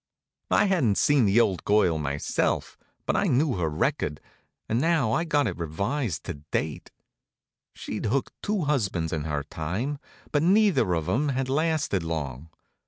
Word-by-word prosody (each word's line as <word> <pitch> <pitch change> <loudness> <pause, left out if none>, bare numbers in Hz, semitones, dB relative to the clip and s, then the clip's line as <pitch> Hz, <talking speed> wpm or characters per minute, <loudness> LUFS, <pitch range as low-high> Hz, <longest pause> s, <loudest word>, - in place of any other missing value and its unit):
I 205 - +4
hadn't 155 - +2
seen 145 -5 +4
the 100 +3 +4
old 95 -6 +1
girl 95 -6 +3
myself, 70 -1 -1 0.3
but - - 0
I - - +2
knew 130 -3 +2
her 80 -3 0
record, 75 -1 -1 0.5
and 115 +3 0
now 160 -8 +2
I 165 +9 +1
got 145 -3 +2
it 90 -6 -3
revised 100 - -2
to - - -4 0.2
date. 75 -1 -3 0.9
She'd - - -4
hooked 135 +5 -1
two 210 -2 -1
husbands 100 - 0
in 75 -2 -2
her 75 -2 -2
time, 95 - -3 0.3
but 145 - +2
neither 175 - +3
of 80 -1 -2
'em 135 +10 +1
had 135 -1 -1
lasted 155 - +1
long. 80 -3 -4
110 Hz, 160 wpm, -26 LUFS, -, 0.9 s, I